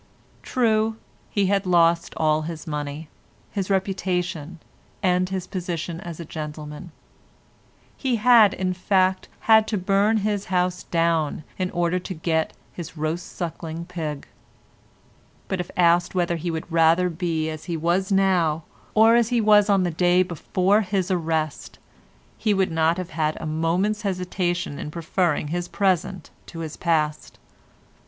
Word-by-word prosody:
True, 220 -3 +1 0.3
he 200 -2 +1
had 195 0 +1
lost 170 -1 +3
all 155 -1 +2
his 160 +1 -6
money, 150 0 -5 0.4
his 195 -2 -3
reputation, 180 -4 -1 0.4
and 180 -1 +2
his 190 -1 -3
position 175 -3 -4
as 170 -3 -8
a 170 - -6
gentleman; 150 +2 -7 1.0
he 260 -3 0
had, 225 -2 +6
in 185 -1 -1
fact, 185 0 +1
had 220 -1 +5
to 215 - -1
burn 200 +4 +2
his 205 -2 -1
house 180 -1 0
down 165 -3 0 0.2
in 185 0 0
order 175 +1 0
to 185 +1 -6
get 160 0 -1 0.2
his 170 -1 -8
roast 155 +3 -3
sucking 170 -1 -5
pig; 160 -5 -5 1.2
but 190 - -2
if 180 - -4
asked 175 0 +3
whether 175 -1 +1
he 170 +2 -3
would 160 +1 -5
rather 165 +2 +4
be 165 -2 -2
as 155 -1 -8
he 170 -2 -3
was 175 +5 0
now 180 -5 +2 0.3
or 225 +2 +6
as 235 -1 +3
he 245 -1 +2
was 210 -1 +5
on 195 -2 +4
the 175 - 0
day 180 +2 +3
before 185 +3 +1
his 190 -2 -1
arrest, 160 -4 -2 0.6
he 210 -2 +2
would 190 -2 +1
not 160 +1 +2
have 185 -2 -5
had 155 -1 -1
a - - -6
moment's 170 +7 0
hesitation 180 -5 -2
in - - -5
preferring 165 -1 -1
his 175 +2 -2
present 185 -2 -1 0.2
to 165 - -7
his 155 -2 -5
past. 155 -3 -1
175 Hz, 150 wpm, -24 LUFS, 165-190 Hz, 1.2 s, had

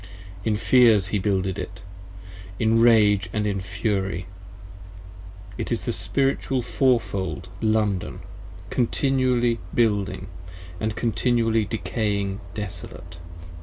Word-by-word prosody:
In 110 -1 +1
fears 110 -4 +4
He 105 - 0
builded 95 -1 0
it, 95 -2 -7 0.8
in 115 +2 +3
rage 105 -5 +5
& - - -16
in 105 -2 -1
fury. 95 -1 -2 1.3
It - - -3
is - - -1
the - - 0
Spiritual 135 -2 0
Fourfold 95 - 0
London: 110 -4 0 0.5
continually 125 -2 +1 0.2
building 105 -5 +1 0.4
& 90 0 -14 0.2
continually 115 -1 +1
decaying 100 -2 -2 0.2
desolate! 95 -4 -7
105 Hz, 95 wpm, -24 LUFS, 95-115 Hz, 1.3 s, rage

